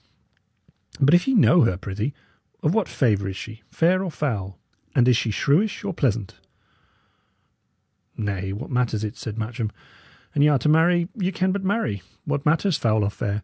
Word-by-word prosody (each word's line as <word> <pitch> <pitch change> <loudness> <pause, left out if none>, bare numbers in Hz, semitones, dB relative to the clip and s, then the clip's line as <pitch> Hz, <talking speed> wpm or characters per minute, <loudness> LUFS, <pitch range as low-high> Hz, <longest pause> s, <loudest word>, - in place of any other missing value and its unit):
But 140 +3 +4
if 175 +5 +4
ye 265 - +2
know 180 -4 +6
her, 95 -6 +2
prithee, 105 +8 -4 0.5
of 150 - +2
what 220 -5 0
favour 105 -7 +1
is 95 - -6
she? 110 +2 -9
fair 185 +3 +2
or 185 - -3
foul? 105 - -3 0.4
And 125 -1 +4
is 125 - +5
she 115 0 0
shrewish 170 - +1
or 200 -2 -3
pleasant?" 115 - -1 1.8
"Nay, 100 -2 -3
what 105 +9 -6
matters 120 -4 0
it?" 105 -1 -4
said 110 -1 -7
Matcham. 115 0 -3 0.6
"An 145 - +1
y' 145 - +6
are 145 - +4
to 130 - -2
marry, 170 +2 +4
ye 185 -3 -1
can 185 0 0
but 195 0 -2
marry. 190 - -1 0.2
What 145 0 -2
matters 165 +3 +2
foul 110 -2 +1
or 100 - 0
fair? 105 0 -3
130 Hz, 180 wpm, -23 LUFS, 105-175 Hz, 1.8 s, know